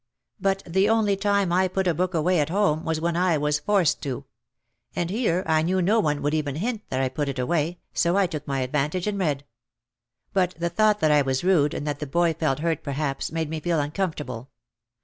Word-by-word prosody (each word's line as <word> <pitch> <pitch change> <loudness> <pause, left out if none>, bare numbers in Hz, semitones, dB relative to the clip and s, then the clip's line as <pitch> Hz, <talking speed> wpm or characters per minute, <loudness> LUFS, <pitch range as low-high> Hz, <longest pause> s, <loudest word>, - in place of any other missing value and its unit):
But 195 -1 0
the 190 +4 +2
only 220 -3 +3
time 200 -2 +1
I 185 +1 +3
put 190 +1 -1
a 175 - +3
book 180 +3 -1
away 170 +2 +2
at 150 - +1
home 170 -4 +1
was 160 -1 -1
when 170 +1 -1
I 175 -2 +2
was 150 0 0
forced 195 -4 +2
to. 130 -4 -4 0.7
And 175 0 -1
here 190 -5 0
I 160 -1 +2
knew 180 +4 +1
no 200 +5 +3
one 150 -5 0
would 145 +1 0
even 150 -3 -1
hint 220 +6 -2
that 130 - -1
I 135 - +2
put 140 +2 -2
it 135 - -4
away 160 +6 0 0.2
so 175 +2 +2
I 200 - +4
took 155 -4 -5
my 135 -1 -1
advantage 150 +7 -1
and 205 -1 -2
read. 145 -6 -1 0.9
But 185 -2 +1
the 170 +1 -1
thought 210 +2 +2
that 155 - +4
I 150 -1 +5
was 135 0 -1
rude 165 -6 +3
and - - -4
that 145 -1 -3
the 150 - -4
boy 170 +3 +2
felt 155 -4 0
hurt 165 -2 0
perhaps, 140 -1 -3
made 160 -1 -2
me 160 - -2
feel 170 0 0
uncomfortable. 145 - -3
165 Hz, 225 wpm, -25 LUFS, 150-185 Hz, 0.9 s, I